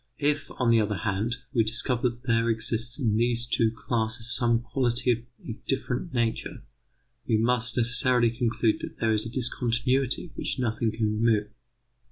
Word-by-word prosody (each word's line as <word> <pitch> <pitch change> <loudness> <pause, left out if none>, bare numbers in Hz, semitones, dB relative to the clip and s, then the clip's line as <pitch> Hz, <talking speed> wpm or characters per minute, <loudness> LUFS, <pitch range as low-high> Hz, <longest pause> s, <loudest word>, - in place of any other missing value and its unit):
If, 145 0 0
on 125 -2 +2
the 115 - +5
other 105 0 -1
hand, 105 +4 -1 0.2
we 115 -4 +3
discover 120 +2 +2
that 120 +1 -12
there 115 -2 +1
exists 115 +2 +1
in 110 -7 +1
these 120 +1 +1
two 115 -2 +1
classes 115 +1 -2
some 120 -2 +2
quality 125 0 0
of 115 - 0 0.3
a - - -3 0.2
different 135 +4 -2
nature, 115 -2 -2 0.6
we 110 - +3
must 120 +2 0
necessarily 120 0 +3
conclude 115 -1 0
that - - -8
there 110 -1 +2
is 110 +1 0
a - - -5
discontinuity 125 +4 -1
which - - -2
nothing 115 -2 0
can 110 +1 -2 0.2
remove. 110 -2 +2
120 Hz, 165 wpm, -26 LUFS, 115-125 Hz, 0.6 s, the